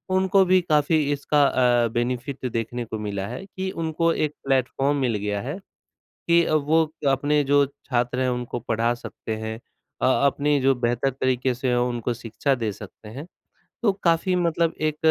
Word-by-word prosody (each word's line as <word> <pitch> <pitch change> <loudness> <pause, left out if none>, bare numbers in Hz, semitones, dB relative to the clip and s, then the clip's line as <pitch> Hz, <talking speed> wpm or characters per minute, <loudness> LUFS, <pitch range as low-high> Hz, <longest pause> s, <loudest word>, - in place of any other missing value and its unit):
उनको 190 +1 +4
भी 185 +1 +4
काफ़ी 155 -1 +2
इसका 145 +1 +2
अ, 120 -3 +3
बेनिफिट 125 +3 -2
देखने 115 +1 -3
को 110 -1 -6
मिला 100 -2 -3
है, 190 - -7
कि 190 -1 -5
उनको 165 0 0
एक 150 -1 -1
प्लेटफॉर्म 135 +2 +1
मिल 120 -4 +1
गया 105 0 -2
है 140 - -5 0.7
कि 170 0 +5
अ, - - -1
वो 155 +1 +2 0.2
अपने 145 +2 +2
जो 145 +1 +4
छात्र 125 -3 -2
हैं 130 - +1
उनको 125 -1 -3
पढ़ा 115 0 0
सकते 115 -2 -6
हैं 110 0 -5 0.4
अ, - - +2 0.2
अपनी 145 +1 +1
जो 135 +1 +3
बेहतर 120 +2 0
तरीके 130 0 0
से 125 0 -1
उनको 120 -1 -1
शिक्षा 120 +4 -1
दे 115 -4 -2
सकते 105 +1 -12
हैं। 140 +9 -8 0.6
तो 215 - +4
काफ़ी 170 +2 +2
मतलब 170 -2 +1
एक 155 -1 0
135 Hz, 170 wpm, -24 LUFS, 120-155 Hz, 0.7 s, कि